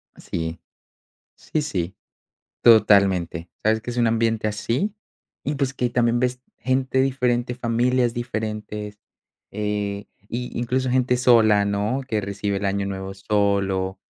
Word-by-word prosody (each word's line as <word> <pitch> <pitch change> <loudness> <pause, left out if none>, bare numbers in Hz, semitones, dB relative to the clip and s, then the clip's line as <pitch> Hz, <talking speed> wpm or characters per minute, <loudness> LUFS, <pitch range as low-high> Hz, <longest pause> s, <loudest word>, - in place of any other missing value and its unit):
Sí. 80 -1 -4 0.8
Sí, 155 - -2
sí. 95 - -3 0.7
Totalmente. 100 -6 +4
¿Sabes?, 110 0 +2
que 120 - -5
es 120 - -6
un 120 -1 +3
ambiente 115 -1 +1
así 120 - -1 0.5
y, 145 +1 -2
pues, 135 -1 -1
que 125 -2 -1
también 120 0 +2
ves 125 0 -1 0.2
gente 130 0 +1
diferente, 125 -2 0
familias 120 0 +1
diferentes, 105 -3 -4 0.5
eh, 105 -1 -2 0.2
y 125 +2 -5
incluso 130 +2 0
gente 125 0 +2
sola, 110 -5 +5
¿no?, 105 +6 0
que 110 -3 0
recibe 100 0 -2
el 100 - -3
año 100 0 0
nuevo 95 0 -5
solo, 95 -2 0
110 Hz, 130 wpm, -23 LUFS, 100-125 Hz, 0.8 s, sola